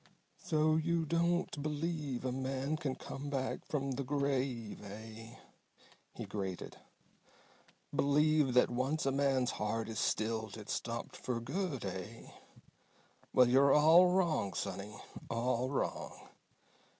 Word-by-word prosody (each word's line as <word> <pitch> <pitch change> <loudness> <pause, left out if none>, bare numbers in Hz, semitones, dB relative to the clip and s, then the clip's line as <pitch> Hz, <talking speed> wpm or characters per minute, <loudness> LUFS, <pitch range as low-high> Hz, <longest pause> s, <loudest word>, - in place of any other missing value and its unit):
"So 155 0 +3
you 165 +1 +1
don't 170 -1 0
believe 150 -3 -2
a 130 - 0
man 135 +3 -2
can 145 -4 -2
come 145 +1 -6
back 135 -2 -2
from 140 -3 -1
the 135 +2 -2
grave, 135 -5 -1
eh?" 110 +3 -9 0.8
he - - -5
grated. 95 -3 -5 1.2
"Believe 150 -2 +3
that 125 - +5
once 135 +6 0
a 135 - +2
man's 135 -2 +2
heart 110 +2 -2
is 110 - -3
stilled 110 -1 -1
it's 105 -1 -5
stopped 115 0 -4
for 125 -2 -3
good, 140 - -3
eh? 95 +5 -6 1.0
Well, 125 -1 +6
you're 135 +3 +5
all 160 +4 +7
wrong, 175 - +1
sonny. 100 +1 -4 0.3
All 120 +2 0
wrong! 140 - -3
135 Hz, 125 wpm, -34 LUFS, 115-150 Hz, 1.2 s, all